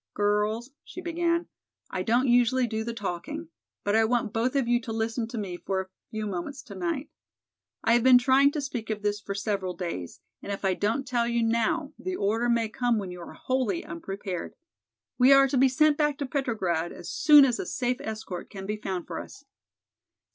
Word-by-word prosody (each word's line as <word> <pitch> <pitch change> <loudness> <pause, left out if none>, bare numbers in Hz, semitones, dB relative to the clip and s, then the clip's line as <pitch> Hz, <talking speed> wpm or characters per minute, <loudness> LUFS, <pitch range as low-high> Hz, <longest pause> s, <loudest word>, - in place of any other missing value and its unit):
"Girls," 210 +4 0
she - - -10
began, 340 -1 0 0.5
"I - - -2
don't 245 +3 +2
usually 245 +1 +4
do 220 -1 -2
the 235 - -3
talking, 230 - -5 0.3
but 205 +1 +1
I 225 - +5
want 230 -1 0
both 245 +4 0
of 270 -4 +2
you 240 0 +2
to 225 - -6
listen 225 +1 -1
to 235 - -7
me 190 -4 -4
for 190 +1 -2
a 190 0 -5 0.2
few 215 -1 -4
moments 205 +7 -5
tonight. 195 - -4 0.7
I 230 - +4
have 240 - +4
been 255 +1 +8
trying 265 +2 +5
to 300 - -2
speak 245 -5 -5
of 210 -1 -3
this 205 0 0
for 200 -1 -5
several 195 -3 -2
days, 130 - -5 0.2
and - - -6
if 200 0 -4
I 190 - +3
don't 225 +8 -1
tell 240 -2 +1
you 235 -1 +1
now 255 +7 0
the 370 0 -3
order 225 - 0
may 230 -1 +2
come 240 +1 0
when 195 -3 -4
you 180 0 -8
are - - -9
wholly 255 -8 -1
unprepared. 185 +1 -5 0.6
We 255 +2 +7
are 275 0 +7
to 270 - -2
be 265 0 +6
sent 300 +3 +3
back 295 -2 +2
to 285 - -2
Petrograd 210 - -1
as - - -9
soon 295 -2 +7
as 250 -2 0
a 380 - -4
safe 250 -3 -1
escort 215 -5 -6
can 195 -2 -8
be 210 +2 -2
found 190 -4 -4
for - - -5
us." - - -11
230 Hz, 205 wpm, -27 LUFS, 200-260 Hz, 0.7 s, been